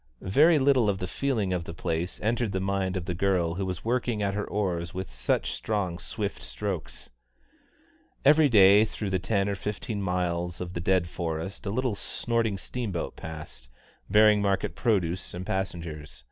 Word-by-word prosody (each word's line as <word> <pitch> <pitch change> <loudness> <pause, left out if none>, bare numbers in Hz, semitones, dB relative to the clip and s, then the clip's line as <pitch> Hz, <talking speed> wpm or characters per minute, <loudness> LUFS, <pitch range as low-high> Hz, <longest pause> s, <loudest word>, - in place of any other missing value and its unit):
Very 160 +5 +6
little 130 -5 +4
of 100 - 0
the 90 - -3
feeling 110 -2 -1
of 90 -2 -1
the 85 - -8
place 85 +1 -2
entered 115 -1 0
the 95 - 0
mind 95 -1 -1
of 90 - -4
the 90 - -2
girl 90 -2 +1
who 95 +2 -3
was 90 +1 -5
working 120 -2 0
at 100 -1 0
her 105 +1 -2
oars 90 -4 -2
with 95 0 -3
such - - 0
strong, 95 - -2
swift 105 -2 -4
strokes. 95 -8 -5 1.1
Every 150 +1 +6
day 100 -2 +7
through 105 -2 -4
the 95 - +1
ten 100 +2 0
or 100 - 0
fifteen 105 +2 -4
miles 90 -2 -1
of 90 0 -5
the 85 - -3
dead 90 -1 +2
forest 85 +4 -4
a - - 0
little 125 +2 0
snorting 115 0 -1
steamboat 100 -5 -4
passed, 75 -6 -8 0.4
bearing 105 +1 +6
market 100 -1 0
produce 95 -7 0
and 90 +1 -5
passengers. 80 -8 -4
95 Hz, 175 wpm, -27 LUFS, 85-105 Hz, 1.1 s, day